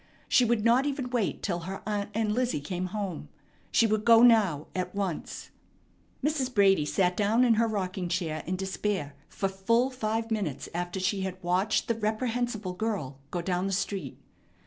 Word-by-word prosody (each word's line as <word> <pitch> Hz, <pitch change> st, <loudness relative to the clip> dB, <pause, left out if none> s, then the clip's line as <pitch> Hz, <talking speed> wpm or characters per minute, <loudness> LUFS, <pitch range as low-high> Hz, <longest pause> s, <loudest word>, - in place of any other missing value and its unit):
She 250 Hz, -, +4 dB
would 230 Hz, -2 st, +1 dB
not 245 Hz, +4 st, +4 dB
even 265 Hz, -3 st, -3 dB
wait 235 Hz, -6 st, -1 dB
till 175 Hz, -4 st, -1 dB
her 185 Hz, +3 st, -6 dB
aunt 205 Hz, -1 st, -2 dB
and 220 Hz, -1 st, +1 dB
Lizzie 245 Hz, -5 st, 0 dB
came 180 Hz, +5 st, -3 dB
home. 185 Hz, -6 st, -5 dB, 0.4 s
She 230 Hz, -, +4 dB
would 215 Hz, -1 st, +1 dB
go 230 Hz, 0 st, +7 dB
now, 205 Hz, -11 st, +5 dB
at 185 Hz, +1 st, -3 dB
once. 195 Hz, -5 st, -4 dB, 0.7 s
Mrs. 280 Hz, -3 st, 0 dB
Brady 195 Hz, -8 st, +4 dB
sat 180 Hz, 0 st, +1 dB
down 215 Hz, +5 st, +3 dB
in 235 Hz, -, +5 dB
her 230 Hz, +1 st, +2 dB
rocking 185 Hz, -4 st, -2 dB
chair 165 Hz, -3 st, -2 dB
in 185 Hz, -, -1 dB
despair 190 Hz, -4 st, -2 dB, 0.2 s
for 195 Hz, -, -1 dB
full 230 Hz, +7 st, +1 dB
five 225 Hz, -2 st, -2 dB
minutes 200 Hz, -11 st, -2 dB
after 175 Hz, +2 st, -3 dB
she 195 Hz, +1 st, 0 dB
had 190 Hz, -1 st, -3 dB
watched 180 Hz, +4 st, +1 dB
the 230 Hz, -, +2 dB
reprehensible 220 Hz, -2 st, -2 dB
girl 180 Hz, -10 st, -3 dB
go 175 Hz, -1 st, -3 dB
down 180 Hz, +1 st, 0 dB
the -, -, -2 dB
street. 195 Hz, +1 st, -3 dB
200 Hz, 175 wpm, -28 LUFS, 185-230 Hz, 0.7 s, go